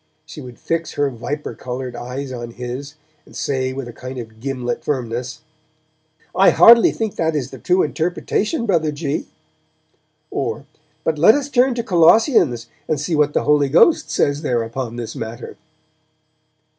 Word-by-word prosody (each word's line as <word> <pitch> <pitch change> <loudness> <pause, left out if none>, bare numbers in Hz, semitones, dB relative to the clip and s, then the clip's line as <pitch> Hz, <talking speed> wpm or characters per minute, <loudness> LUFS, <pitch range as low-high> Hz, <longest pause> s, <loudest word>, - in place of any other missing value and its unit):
She - - -10
would 125 -2 -11
fix 165 0 -3
her 145 -1 0
viper 145 +5 -5
coloured 125 0 -6
eyes 130 +3 -6
on 120 -2 -7
his, 125 +4 -6 0.3
and - - -18
say 130 -2 -1
with 130 -1 -6
a 120 - -9
kind 130 +2 -8
of 110 -2 -9
gimlet 125 -1 -3
firmness, 125 +1 -3 0.9
'I 195 - +5
hardly 235 0 +7
think 220 -3 -4
that 160 -1 0
is 135 -3 -3
the - - -10
true 185 +1 +2
interpretation, 195 - -1
Brother 165 -7 +1
G.', 145 0 -3 1.0
or, 140 - -3 0.4
'But 155 -2 -1
let 195 +8 +7
us 285 -1 -2
turn 255 -1 +3
to 235 - -2
Colossians, 170 - +4 0.2
and 155 - 0
see 150 +4 -3
what 150 -1 +2
the - - +1
Holy 145 -1 +3
Ghost 240 - +4
says 145 +1 0
there 120 -6 0
upon 115 +1 -5
this 115 -2 -6
matter.' 115 +2 -7
140 Hz, 160 wpm, -20 LUFS, 125-165 Hz, 1.0 s, hardly